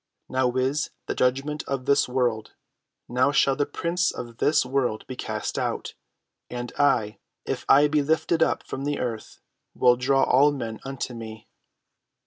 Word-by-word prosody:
Now 130 Hz, -1 st, +1 dB
is 130 Hz, +4 st, 0 dB, 0.2 s
the -, -, -2 dB
judgment 135 Hz, +4 st, 0 dB
of 135 Hz, -2 st, -3 dB
this 140 Hz, -2 st, +3 dB
world: 120 Hz, -4 st, -1 dB, 0.5 s
now 130 Hz, +3 st, +2 dB
shall 135 Hz, -1 st, +3 dB
the 145 Hz, +1 st, 0 dB
prince 170 Hz, +4 st, 0 dB
of 120 Hz, -1 st, -8 dB
this 145 Hz, 0 st, +3 dB
world 125 Hz, -4 st, -1 dB
be 130 Hz, -, -7 dB
cast -, -, -4 dB
out. -, -, -3 dB, 0.6 s
And 120 Hz, -1 st, -5 dB
I, 115 Hz, -7 st, +2 dB, 0.3 s
if -, -, -3 dB
I 145 Hz, +2 st, +7 dB
be 150 Hz, 0 st, +2 dB
lifted 160 Hz, +2 st, +1 dB
up -, -, +2 dB
from 135 Hz, -, -5 dB
the 145 Hz, 0 st, -1 dB
earth, 115 Hz, -3 st, -5 dB, 0.3 s
will 125 Hz, 0 st, +4 dB
draw 135 Hz, +2 st, +2 dB
all 145 Hz, +3 st, +5 dB
men 115 Hz, -6 st, -5 dB
unto 135 Hz, -2 st, -5 dB
me." 110 Hz, -2 st, -9 dB
130 Hz, 160 wpm, -25 LUFS, 125-145 Hz, 0.6 s, I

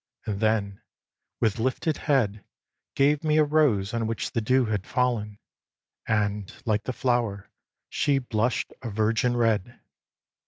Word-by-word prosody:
and 100 Hz, -2 st, -3 dB
then, 105 Hz, -3 st, 0 dB, 0.6 s
with 110 Hz, 0 st, +1 dB
lifted 130 Hz, +6 st, 0 dB
head, 110 Hz, -10 st, 0 dB, 0.5 s
Gave 145 Hz, +2 st, +3 dB
me 155 Hz, -1 st, +2 dB
a 155 Hz, -, +6 dB
rose 145 Hz, -10 st, +2 dB
on 115 Hz, -1 st, -1 dB
which 115 Hz, 0 st, -3 dB
the 115 Hz, -, -1 dB
dew 130 Hz, +3 st, +3 dB
had 105 Hz, -3 st, -2 dB
fallen; 115 Hz, -5 st, 0 dB, 0.7 s
And, 105 Hz, -2 st, 0 dB
like 110 Hz, -2 st, 0 dB
the -, -, -1 dB
flower, 120 Hz, -5 st, -1 dB, 0.4 s
she 145 Hz, -2 st, +1 dB
blush'd 120 Hz, -2 st, -1 dB
a 120 Hz, -, -5 dB
virgin 110 Hz, +3 st, +1 dB
red. 115 Hz, -1 st, 0 dB
115 Hz, 135 wpm, -26 LUFS, 105-130 Hz, 0.7 s, a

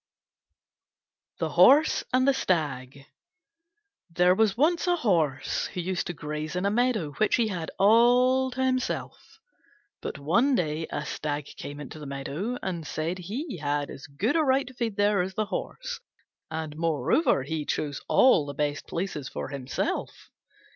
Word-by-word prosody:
THE -, -, -1 dB
HORSE 300 Hz, +3 st, +5 dB
AND 255 Hz, +1 st, +3 dB
THE 275 Hz, -, +5 dB
STAG 140 Hz, -, -2 dB, 1.0 s
There 180 Hz, +2 st, +4 dB
was 215 Hz, +1 st, +2 dB
once 335 Hz, +6 st, +2 dB
a 355 Hz, -, +4 dB
Horse 155 Hz, -, 0 dB
who 185 Hz, -, -7 dB
used 180 Hz, 0 st, -2 dB
to 175 Hz, -, -3 dB
graze 150 Hz, +1 st, -5 dB
in 180 Hz, +2 st, -1 dB
a 200 Hz, -, +2 dB
meadow 225 Hz, -9 st, +1 dB
which 215 Hz, -, +3 dB
he 230 Hz, -3 st, +1 dB
had 175 Hz, -5 st, -4 dB
all 245 Hz, +5 st, +5 dB
to 260 Hz, +1 st, -1 dB
himself. 255 Hz, 0 st, -3 dB, 0.6 s
But -, -, -5 dB
one 230 Hz, -, +2 dB
day 160 Hz, -4 st, -1 dB
a -, -, -4 dB
Stag 145 Hz, -1 st, -3 dB
came 145 Hz, 0 st, -8 dB
into 150 Hz, +2 st, -8 dB
the 150 Hz, -, -8 dB
meadow, 145 Hz, -, -4 dB
and 170 Hz, -5 st, -4 dB
said 165 Hz, +4 st, -3 dB
he 225 Hz, -, -5 dB
had 145 Hz, 0 st, -1 dB
as 135 Hz, -, -10 dB
good 195 Hz, -, -1 dB
a 325 Hz, -, +4 dB
right 270 Hz, -2 st, +2 dB
to 255 Hz, -, -11 dB
feed 235 Hz, -4 st, -3 dB
there 205 Hz, -1 st, +3 dB
as 185 Hz, +1 st, -4 dB
the 215 Hz, -, 0 dB
Horse, -, -, -5 dB, 0.5 s
and 160 Hz, -1 st, -5 dB
moreover 165 Hz, -, +1 dB, 0.2 s
chose 145 Hz, -3 st, -2 dB
all 175 Hz, -, +5 dB
the 140 Hz, -, -6 dB
best 145 Hz, 0 st, -2 dB
places 165 Hz, -6 st, -4 dB
for -, -, -5 dB
himself. 135 Hz, -2 st, -4 dB
180 Hz, 160 wpm, -27 LUFS, 150-245 Hz, 1.0 s, HORSE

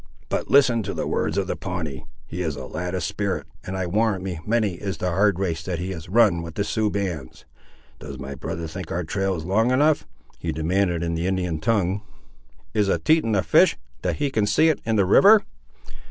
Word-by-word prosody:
But -, -, -2 dB
listen 125 Hz, -5 st, +5 dB
to 100 Hz, -1 st, -4 dB
the -, -, -2 dB
words 80 Hz, +4 st, -1 dB
of 100 Hz, -, +1 dB
the -, -, -3 dB
Pawnee; 85 Hz, -8 st, -5 dB, 0.2 s
he 90 Hz, -, -5 dB
is 80 Hz, -4 st, -2 dB
a -, -, -7 dB
lad 90 Hz, +3 st, -4 dB
of 90 Hz, -, -2 dB
spirit, 100 Hz, +3 st, -2 dB, 0.2 s
and 95 Hz, +1 st, -5 dB
I 95 Hz, -, -1 dB
warrant 100 Hz, +1 st, 0 dB
me 90 Hz, -4 st, -4 dB
many 110 Hz, -3 st, +1 dB
is 95 Hz, +2 st, -5 dB
the 90 Hz, -, -1 dB
hard 100 Hz, +1 st, +3 dB
race 85 Hz, -4 st, -1 dB
that 85 Hz, +1 st, -3 dB
he 90 Hz, +3 st, -4 dB
has 80 Hz, -3 st, -7 dB
run 100 Hz, -5 st, +4 dB
with 85 Hz, -1 st, -8 dB
the 100 Hz, -, 0 dB
Sioux 110 Hz, +1 st, 0 dB
bands. 90 Hz, -10 st, -4 dB, 0.5 s
Does 70 Hz, -2 st, -8 dB
my 70 Hz, +1 st, -6 dB
brother 85 Hz, +4 st, -5 dB
think 90 Hz, +1 st, -7 dB
our 90 Hz, +1 st, -1 dB
trail 95 Hz, +3 st, -1 dB
is 80 Hz, -2 st, -6 dB
long 110 Hz, +6 st, +2 dB
enough?" 145 Hz, +4 st, +3 dB, 0.3 s
he -, -, -2 dB
demanded 85 Hz, +3 st, 0 dB
in 85 Hz, 0 st, -1 dB
the 85 Hz, +2 st, -1 dB
Indian 90 Hz, -4 st, -1 dB
tongue. 100 Hz, +1 st, +1 dB, 0.7 s
"Is 105 Hz, -2 st, +2 dB
a -, -, +2 dB
Teton 155 Hz, -9 st, +2 dB
a 95 Hz, -, +2 dB
fish, -, -, +4 dB, 0.2 s
that -, -, -1 dB
he 145 Hz, -2 st, -1 dB
can 105 Hz, -4 st, +1 dB
see 155 Hz, +10 st, +4 dB
it 155 Hz, -, 0 dB
in 115 Hz, -, +2 dB
the 100 Hz, -3 st, +3 dB
river?" 205 Hz, -, +7 dB
95 Hz, 220 wpm, -24 LUFS, 85-105 Hz, 0.7 s, river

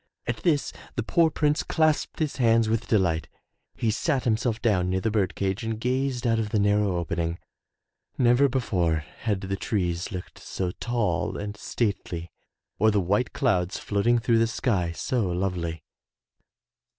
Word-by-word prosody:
At -, -, -2 dB
this 155 Hz, -5 st, +1 dB, 0.2 s
the -, -, -1 dB
poor 170 Hz, -2 st, +3 dB
Prince 150 Hz, 0 st, +1 dB
clasped 155 Hz, -2 st, +1 dB
his 155 Hz, -3 st, -1 dB
hands 115 Hz, -3 st, +4 dB
with 115 Hz, +1 st, -1 dB
delight. 90 Hz, -8 st, +1 dB, 0.5 s
He 115 Hz, -, 0 dB
sat 135 Hz, +4 st, 0 dB
himself 115 Hz, 0 st, 0 dB
down 95 Hz, -7 st, +2 dB
near 95 Hz, +1 st, +1 dB
the 110 Hz, +3 st, -1 dB
bird 100 Hz, -4 st, 0 dB
cage 100 Hz, +3 st, -1 dB
and 110 Hz, -1 st, -3 dB
gazed 130 Hz, +1 st, -1 dB
out 115 Hz, -1 st, +2 dB
of 110 Hz, -1 st, -1 dB
the 105 Hz, -, 0 dB
narrow 105 Hz, -2 st, +2 dB
opening. 85 Hz, 0 st, -2 dB, 0.8 s
Never 125 Hz, +3 st, +4 dB
before 95 Hz, -11 st, +1 dB, 0.2 s
had 105 Hz, -4 st, -1 dB
the 95 Hz, 0 st, -2 dB
trees 90 Hz, -2 st, -2 dB
looked 90 Hz, -2 st, -7 dB
so 90 Hz, -2 st, -3 dB
tall 115 Hz, -9 st, -1 dB
and 105 Hz, 0 st, -5 dB
stately, 100 Hz, -6 st, -3 dB, 0.5 s
or 110 Hz, -, +5 dB
the 105 Hz, -1 st, +2 dB
white 100 Hz, +7 st, +1 dB
clouds 95 Hz, -8 st, +1 dB
floating 105 Hz, +4 st, +1 dB
through 115 Hz, 0 st, +2 dB
the 115 Hz, -, +3 dB
sky 100 Hz, -7 st, 0 dB
so 110 Hz, +4 st, -1 dB
lovely. 85 Hz, -3 st, -2 dB
105 Hz, 160 wpm, -26 LUFS, 90-120 Hz, 0.8 s, or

